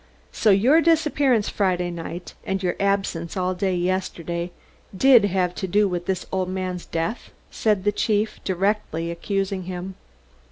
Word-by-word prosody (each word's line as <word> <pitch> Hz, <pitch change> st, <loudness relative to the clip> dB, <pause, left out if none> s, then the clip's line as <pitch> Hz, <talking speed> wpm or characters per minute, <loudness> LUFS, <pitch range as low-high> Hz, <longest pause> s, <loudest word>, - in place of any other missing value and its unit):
"So 220 Hz, -, +2 dB
your 240 Hz, +12 st, +5 dB
disappearance 295 Hz, -8 st, +2 dB
Friday 180 Hz, -3 st, 0 dB
night, 170 Hz, +1 st, -7 dB
and 190 Hz, 0 st, -2 dB
your 175 Hz, -1 st, 0 dB
absence 195 Hz, -4 st, -1 dB
all 185 Hz, 0 st, 0 dB
day 185 Hz, 0 st, -1 dB
yesterday 175 Hz, -1 st, -2 dB, 0.5 s
did 250 Hz, -2 st, +6 dB
have 185 Hz, -2 st, 0 dB
to 190 Hz, -, -4 dB
do 205 Hz, +3 st, +3 dB
with 175 Hz, -2 st, -3 dB
this 190 Hz, -2 st, -1 dB
old 185 Hz, -1 st, -1 dB
man's 185 Hz, -1 st, -4 dB
death?" 165 Hz, +8 st, -3 dB, 0.2 s
said 210 Hz, -4 st, +1 dB
the 205 Hz, -, +3 dB
chief, 210 Hz, +1 st, 0 dB
directly 190 Hz, -3 st, -1 dB
accusing 195 Hz, +2 st, -2 dB
him. 185 Hz, +1 st, -5 dB
190 Hz, 150 wpm, -23 LUFS, 180-205 Hz, 0.5 s, did